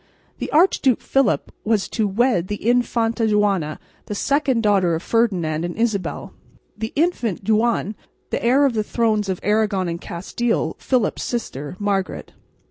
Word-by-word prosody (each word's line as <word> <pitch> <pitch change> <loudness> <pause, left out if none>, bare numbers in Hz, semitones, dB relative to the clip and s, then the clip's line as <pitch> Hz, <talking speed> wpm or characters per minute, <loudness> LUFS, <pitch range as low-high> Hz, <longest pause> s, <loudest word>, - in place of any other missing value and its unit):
The - - -3
Archduke 295 - +3
Philip 270 0 +1
was 215 -2 +1
to 220 -2 0
wed 200 -3 +1
the 205 - -3
Infanta 235 -2 +1
Juana, 200 -7 +1 0.3
the 210 - -4
second 275 -1 +1
daughter 190 -5 +3
of 160 - -5
Ferdinand 180 -9 +1
and 175 +1 -4
Isabel; 220 -4 -2 0.4
the 220 +1 -4
Infante 235 - 0
Juan, 220 -1 +1 0.4
the - - -2
heir 265 +4 +4
to 260 - -1
the 215 -1 0
thrones 215 -3 0
of 185 - -2
Aragon 210 -3 +1
and 170 0 -4
Castile, 225 +7 -2
Philip's 250 -5 0
sister, 150 - -4
Margaret. 200 -2 -2
215 Hz, 145 wpm, -21 LUFS, 190-240 Hz, 0.4 s, heir